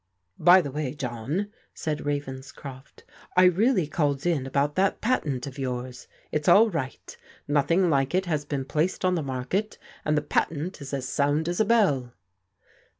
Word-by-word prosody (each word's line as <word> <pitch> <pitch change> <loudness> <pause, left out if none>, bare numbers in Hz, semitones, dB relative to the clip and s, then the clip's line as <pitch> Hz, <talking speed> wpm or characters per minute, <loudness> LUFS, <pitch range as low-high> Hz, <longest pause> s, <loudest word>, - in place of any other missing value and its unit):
By 180 +1 +7
the 145 -5 -5
way, 145 -1 -3
John,'* 135 - -3 0.3
said 150 -2 -3
Ravenscroft, 135 -1 -6 0.3
"I 185 - +7
really 185 +2 +4
called 145 -2 -1
in 155 -7 0
about 140 +2 0
that 190 +3 +1
patent 150 - -1
of 140 0 -8
yours. 125 -1 -4 0.2
It's 150 -1 -2
all 215 +5 +6
right. 135 -6 -5 0.3
Noth 145 -1 +1
ing 180 +2 +4
like 140 0 +1
it 190 +1 +1
has 155 -4 -1
been 140 -2 -3
placed 160 +7 -1
on 185 - +3
the 170 - 0
market, 140 +10 -2 0.3
and 150 0 +1
the 150 - 0
patent 155 +3 -1
is 140 - -7
as 135 -2 -3
sound 145 +4 +1
as 175 0 -2
a 220 - +4
bell." 145 - +2
145 Hz, 170 wpm, -26 LUFS, 135-175 Hz, 0.3 s, By